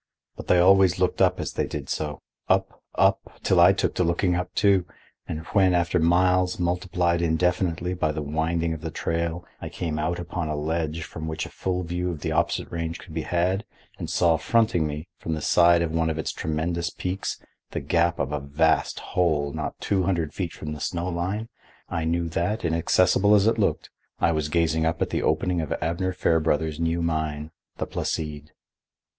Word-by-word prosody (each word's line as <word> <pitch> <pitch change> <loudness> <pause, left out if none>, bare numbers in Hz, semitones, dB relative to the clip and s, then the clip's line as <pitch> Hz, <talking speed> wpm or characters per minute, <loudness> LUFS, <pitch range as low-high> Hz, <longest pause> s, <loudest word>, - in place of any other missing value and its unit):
But - - -9
they 90 - +5
always 95 0 +5
looked 90 -1 0
up - - +3
as - - -3
they - - -1
did - - -5
so, 75 -2 -3 0.3
up, - - +1
up, - - +1
till - - +3
I - - +8
took - - 0
to - - +1
looking 90 +2 +1
up, 90 +1 -2
too, 100 -4 +3 0.4
and 80 - -4
when, 95 -2 +4
after 85 +1 +2
miles 90 +2 +3
multiplied 90 -1 0
indefinitely 90 +1 0
by 85 -4 0
the 75 0 -4
winding 80 +3 -1
of 80 - -7
the 80 - -4
trail, 85 +2 -2 0.2
I - - -5
came 80 -3 -3
out 85 +3 -1
upon 85 -1 -4
a 75 - -2
ledge 80 +1 -2
from 80 0 -7
which 80 -1 -3
a - - -8
full 90 -1 -2
view 90 +1 -2
of 80 -4 -5
the - - -2
opposite - - 0
range 85 0 -3
could 85 - -13
be 80 - -2
had, 90 +5 0 0.4
and - - -4
saw 85 -2 +3
fronting 90 -3 +2
me, 75 +3 -5
from 80 - -3
the - - -4
side 85 +1 +5
of 80 - -2
one 80 0 +1
of 80 - -2
its 80 - -2
tremendous 80 +2 -2
peaks, 90 +4 -4 0.3
the - - -3
gap 85 0 +1
of 70 - -2
a 75 - -1
vast 75 +4 +1
hole 75 -5 +1
not - - -4
two 95 -2 0
hundred 85 -5 -1
feet 90 -4 -3
from 75 0 -6
the 75 - -7
snowline, 90 +6 -2 0.4
I 85 -2 -2
knew 85 +1 0
that, 90 +5 -1
inaccessible 90 +5 +3
as 100 -1 +4
it 115 0 +2
looked, 100 - 0 0.3
I - - +3
was 75 -2 -1
gazing 80 0 +1
up 80 0 0
at - - -5
the - - 0
opening 85 +3 +1
of 80 - -5
Abner 85 +3 -1
Fairbrother's 80 -3 +1
new 85 0 0
mine, 80 -2 -2 0.3
the - - -2
Placide. 75 -1 -4
85 Hz, 195 wpm, -25 LUFS, 80-90 Hz, 0.4 s, I